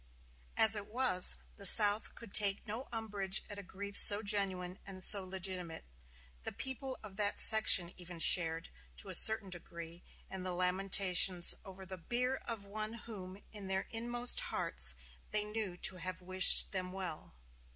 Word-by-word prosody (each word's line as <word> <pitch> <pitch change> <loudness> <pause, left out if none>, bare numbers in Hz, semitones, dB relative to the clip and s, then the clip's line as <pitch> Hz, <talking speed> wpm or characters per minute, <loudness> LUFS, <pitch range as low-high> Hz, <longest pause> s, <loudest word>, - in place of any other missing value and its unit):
As 220 0 +4
it 205 -1 -8
was, 225 -6 +3 0.2
the 200 - -5
South 210 +1 +7
could 230 -4 -13
take 200 -2 +1
no 225 +5 -8
umbrage 205 -4 -2
at 205 - -9
a - - -8
grief 200 +1 -11
so 205 +1 +9
genuine 190 -3 -4
and 185 -1 -9
so 200 -2 0
legitimate; 185 -3 -7 0.6
the - - -8
people 265 0 -7
of 200 -2 -14
that 205 -1 -4
section 205 -5 +4
even 175 -1 -11
shared, 165 -1 +1 0.3
to - - -9
a - - -6
certain 220 -3 +3
degree, 170 -1 -10 0.3
in 190 -1 -9
the 185 0 -7
lamentations 185 -1 0
over 190 -1 -13
the 185 0 -11
bier 250 +8 -4
of 225 -4 -9
one 215 +2 -8
whom 205 -4 -12
in 205 -3 -10
their 190 0 -5
inmost 240 +2 -1
hearts 60 0 -4 0.3
they 210 0 -2
knew 210 -4 -7
to 185 +1 -1
have 185 0 -7
wished 185 0 +5
them 185 -2 -7
well. 180 - -8
195 Hz, 160 wpm, -31 LUFS, 180-215 Hz, 0.6 s, so